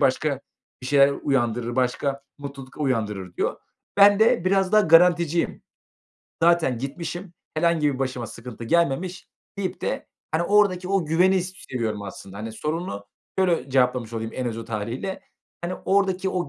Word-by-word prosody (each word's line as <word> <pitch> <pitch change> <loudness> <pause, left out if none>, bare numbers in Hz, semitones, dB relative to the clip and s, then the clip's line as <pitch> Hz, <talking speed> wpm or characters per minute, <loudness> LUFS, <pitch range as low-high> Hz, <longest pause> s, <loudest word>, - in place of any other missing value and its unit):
başka 140 0 +1 0.4
bir 125 - -5
şeyler 140 0 +5
uyandırır. 120 -3 0
Başka 135 +2 0 0.2
mutluluk 140 -2 -9
uyandırır." 105 -9 -2
diyor. - - 0 0.4
Ben 200 0 +7
de 220 -6 +4
biraz 190 +1 +2
daha 215 - +7
garanticiyim. 170 -1 +4 0.8
Zaten 165 -8 +3
gitmişim. 170 +6 -5 0.2
Herhangi 155 -3 +2
bir 130 - -6
başıma 130 -3 -2
sıkıntı 115 0 -9
gelmemiş 170 +5 0 0.3
deyip 190 -2 -3
de, - - -3 0.3
hani, 160 +2 +2
oradaki 185 -2 +3
o 195 -3 +1
güveni 180 +3 +3
s 185 - -6 0.2
seviyorum 110 -4 -2
aslında. 100 -1 -9
Hani, 110 +1 -5
sorunu 150 - -4 0.3
şöyle 175 -7 +1
cevaplamış 125 -3 +2
olayım 115 0 -3
en 130 - -2
özet 115 0 -6
hâliyle. 115 - -3 0.4
Hani, 180 +1 -2
oradaki 190 -1 +2
o 180 -5 -2
145 Hz, 145 wpm, -24 LUFS, 125-180 Hz, 0.8 s, Ben